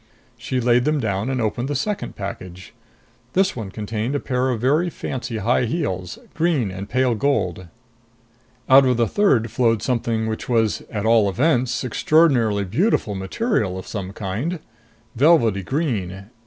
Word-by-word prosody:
She 130 - -3
laid 120 0 +3
them 150 0 +1
down 105 -1 -1
and 130 -1 -1
opened 120 +3 -1
the 145 - -2
second 205 +9 -3
package. 95 -2 -8 0.6
This 190 +1 +2
one 110 -5 -5
contained 110 +5 -3
a - - +1
pair 130 -1 -1
of 120 -3 -1
very 150 +9 +2
fancy 125 -7 -5
high 120 +4 +1
heels, 95 - -3 0.2
green 155 - 0
and 95 +2 -7
pale 130 0 +2
gold. 100 -7 -1 1.0
Out 135 +1 +7
of 125 -2 +2
the 120 - +3
third 125 - +2
flowed 115 -2 +1
something 115 -3 -1
which 110 +2 -4
was, 115 -3 +1
at 105 -1 -3
all 110 -3 +4
events, 125 - +1
extraordinarily 125 -6 +2
beautiful 110 - 0
material 95 - -1
of 95 - -7
some 95 -3 -5
kind. 110 - -3 0.6
Velvety 120 - +4
green 100 - -3
115 Hz, 155 wpm, -21 LUFS, 100-135 Hz, 1.0 s, Out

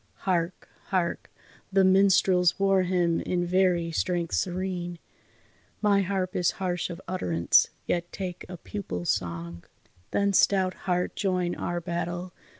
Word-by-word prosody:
Hark! 175 -2 -1 0.2
Hark! 185 -3 -1 0.4
The 195 0 +4
minstrels' 190 -2 +4
war 195 -1 +4
hymn 175 -2 +1
in 175 -1 -1
very 175 -2 +2
strength 175 0 -1
serene, 180 -1 -2 0.8
My 205 -2 +3
harp 185 -1 -2
is 180 - +2
harsh 180 -2 -2
of 170 0 -6
utterance, 85 - +3 0.2
yet 175 0 -2
take 180 -2 -5
a 180 - -7
pupil's 125 - -3
song. 85 0 -4 0.5
Then 200 0 +1
stout 190 -1 +3 0.2
heart 180 0 0
join 180 -3 0
our 175 0 -3
battle! 175 +1 -4
180 Hz, 130 wpm, -27 LUFS, 170-190 Hz, 0.8 s, The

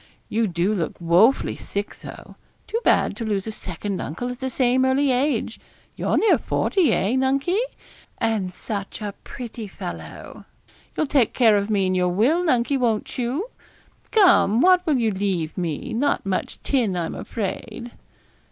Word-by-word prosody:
You 225 0 +1
do 175 +3 0
look 175 -6 -3
wofully 180 +10 +3
sick 200 +1 -5
though; - - -11 0.3
too 455 - -2
bad - - +3
to 235 - -4
lose 205 -3 -1
a 220 - -4
second 195 -1 -4
uncle 245 - -4
at 250 - -8
the 260 - -2
same 255 0 +2
early 265 +1 +2
age. 270 +4 0 0.4
You're - - 0
near 445 - +4
forty, 345 - +1
eh, 205 +2 +1
Nunkie? 275 +8 +1 0.6
and 220 -5 -1
such 200 +1 -5
a 205 -2 -4
pretty 235 -3 -7
fellow! - - -8 0.5
You'll 310 - +2
take 270 -5 +2
care 225 -4 +5
of 200 +1 0
me 200 -3 +2
in 185 - +1
your 180 -1 +2
will, 250 - +2
Nunkie, 270 -3 +1
won't 230 -1 -1
you? 275 - -2 0.6
Come, 360 - +5
what 365 +4 +5
will 300 -4 +3
you 225 -3 +1
leave 185 -5 -2
me; 170 +2 -3
not 275 +2 0
much 190 -1 -2
tin, 230 -9 +1
I'm 170 -2 -2
afraid.' 225 +3 -5
225 Hz, 160 wpm, -23 LUFS, 195-265 Hz, 0.6 s, care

